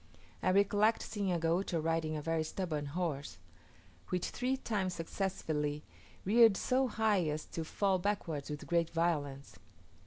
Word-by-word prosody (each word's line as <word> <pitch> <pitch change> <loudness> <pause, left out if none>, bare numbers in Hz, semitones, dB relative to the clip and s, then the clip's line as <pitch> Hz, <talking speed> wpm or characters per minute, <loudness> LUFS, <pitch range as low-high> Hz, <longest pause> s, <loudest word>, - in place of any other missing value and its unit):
I - - +2
recollect 205 +3 +3
seeing 200 -4 -2
a 175 - +2
Gaucho 170 +2 0
riding 160 0 0
a 150 - -5
very 165 0 0
stubborn 155 -3 -3
horse, 150 -2 -3 0.7
which 180 -1 -1
three 255 +2 0
times 195 -7 -1
successively 160 -4 -2 0.4
reared 220 0 +6
so 260 +1 +2
high 215 -6 +2
as 150 +1 -2
to 165 - -2
fall 190 +3 +1
backwards 175 -7 -2
with 150 -1 -5
great 170 -1 +1
violence. 145 - -1
170 Hz, 145 wpm, -33 LUFS, 155-200 Hz, 0.7 s, reared